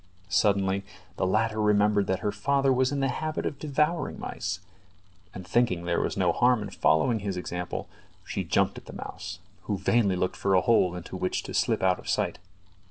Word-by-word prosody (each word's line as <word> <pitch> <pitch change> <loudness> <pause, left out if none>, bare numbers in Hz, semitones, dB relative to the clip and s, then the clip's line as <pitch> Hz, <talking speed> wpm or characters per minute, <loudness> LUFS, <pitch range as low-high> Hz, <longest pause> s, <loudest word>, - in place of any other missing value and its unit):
Suddenly 100 0 +2 0.3
the - - +1
latter 110 +2 +1
remembered 105 -1 +3
that 95 0 0
her 105 - 0
father 135 +6 +2
was 130 +1 +2
in 140 -1 -1
the 135 - +2
habit 155 +4 -3
of 140 - -3
devouring 150 +1 0
mice, 90 +1 -4 0.7
and 95 0 -9
thinking 95 -8 +1
there 85 -1 +1
was - - -2
no 90 -3 +3
harm 120 +3 +3
in 105 - -7
following 110 +9 +2
his 100 -2 -3
example, 90 0 -4 0.4
she - - -3
jumped - - +1
at - - -24
the - - -9
mouse, 90 +1 -7 0.3
who 100 - -1
vainly 100 0 +2
looked 90 0 -1
for 95 -1 +2
a 90 - +5
hole 95 -7 +3
into 90 +1 -7
which 90 0 -1
to - - -7
slip - - +1
out 95 -1 +3
of - - -9
sight. - - 0
100 Hz, 195 wpm, -27 LUFS, 90-120 Hz, 0.7 s, a